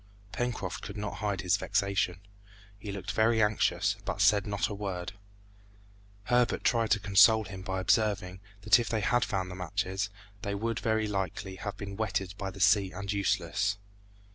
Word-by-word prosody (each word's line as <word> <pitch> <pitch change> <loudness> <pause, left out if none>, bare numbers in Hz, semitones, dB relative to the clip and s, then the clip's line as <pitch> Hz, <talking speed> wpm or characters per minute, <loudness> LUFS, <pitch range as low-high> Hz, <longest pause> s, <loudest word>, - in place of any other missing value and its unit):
Pencroft 120 -7 -3
could 100 - -7
not 105 0 -4
hide 100 -2 -2
his 95 +1 +2
vexation; 100 -3 0 0.6
he 100 +1 -6
looked 100 -1 -5
very 110 +1 +3
anxious, 105 -1 +2
but - - -4
said 105 0 +4
not 100 -1 0
a - - -5
word. 95 -3 -4 1.1
Herbert 120 +2 +2
tried 115 -2 +2
to 105 - +3
console 105 +2 +6
him 95 -2 -8
by 95 0 -3
observing, 95 -2 +1 0.2
that 110 +3 +5
if 120 - -2
they 110 -2 0
had 120 +3 +2
found 95 -2 -2
the - - -7
matches, 95 +2 -2 0.3
they 100 0 -3
would, 115 +2 -2
very 110 -1 0
likely, 95 -1 -3
have 105 +1 -5
been 100 -1 -7
wetted 100 -3 -2
by 95 -1 -4
the 100 - -10
sea 100 0 +4
and 100 0 -4
useless. 100 +1 0
100 Hz, 170 wpm, -30 LUFS, 95-110 Hz, 1.1 s, console